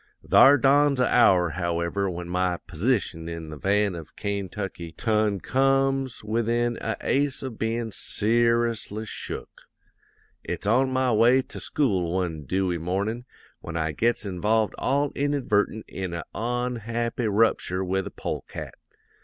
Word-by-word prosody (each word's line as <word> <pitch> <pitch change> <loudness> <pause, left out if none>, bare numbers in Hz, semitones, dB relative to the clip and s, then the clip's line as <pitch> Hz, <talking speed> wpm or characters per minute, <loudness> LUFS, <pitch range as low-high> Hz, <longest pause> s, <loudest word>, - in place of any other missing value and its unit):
"'Thar 140 +2 +7
dawns 140 +1 +4
a 125 - +4
hour, 90 -8 +5
however, 85 +3 -1
when 90 -1 -5
my 90 0 0
p'sition 90 -3 -1
in 85 -2 -6
the - - -6
van 100 +5 +1
of 85 -3 -9
Kaintucky 95 -4 -5
ton 105 -3 +1
comes 135 +1 +1
within 115 +2 0
a 110 - -2
ace 140 0 0
of 130 -5 -6
bein' 115 0 -1
ser'ously 115 0 0
shook. - - -7 0.8
It's - - -4
on 130 +5 +3
my 130 -1 +1
way 120 +4 +4
to - - -9
school 95 - 0
one 85 -5 -2
dewy 90 +2 0
mornin' 100 +8 -2 0.3
when 85 0 -6
I 80 -1 0
gets 115 +5 0
involved 105 +3 +1
all 140 +2 +1
inadvertent 125 -7 0
in 95 -3 -5
a 85 - -4
onhappy 120 0 -2
rupture 100 -3 +2
with 95 +1 -1
a - - -4
polecat. - - -6
110 Hz, 135 wpm, -25 LUFS, 90-120 Hz, 0.8 s, Thar